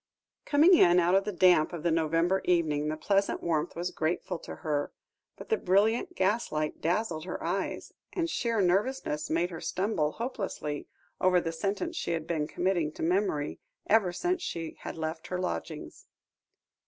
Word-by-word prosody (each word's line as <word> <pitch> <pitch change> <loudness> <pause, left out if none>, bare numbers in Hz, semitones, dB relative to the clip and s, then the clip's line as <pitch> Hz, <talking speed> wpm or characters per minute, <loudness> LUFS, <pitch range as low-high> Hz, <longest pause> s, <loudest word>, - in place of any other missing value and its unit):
Coming 305 +6 +5
in 175 - +6
out 175 +1 +3
of 195 0 +3
the 210 - -1
damp 180 -4 +4
of 165 -3 -5
the 170 - +2
November 165 +3 +2
evening, 155 -4 +2
the 155 0 -2
pleasant 195 +4 +1
warmth 165 -1 -1
was 175 +1 -2
grateful 170 +2 -2
to - - -8
her, 145 -2 0 0.5
but - - -10
the 445 - +3
brilliant 220 - +2
gaslight 185 -7 0
dazzled 170 -1 -1
her 185 - -5
eyes, 185 +3 -3 0.2
and 340 -3 -1
sheer 230 -9 0
nervousness 185 - 0
made 170 +3 +1
her 165 - -7
stumble 165 -2 0
hopelessly 195 - -4 0.3
over 180 -1 +4
the 165 -1 -2
sentence 200 - -2
she 240 - -1
had 165 -2 -2
been 155 -3 -1
committing 175 -3 0
to - - -6
memory, 175 -4 0 0.3
ever 205 -4 +3
since 355 - -1
she 165 - -4
had - - -7
left 160 +1 -4
her 180 - -2
lodgings. 170 -3 -5
175 Hz, 165 wpm, -29 LUFS, 160-200 Hz, 0.5 s, in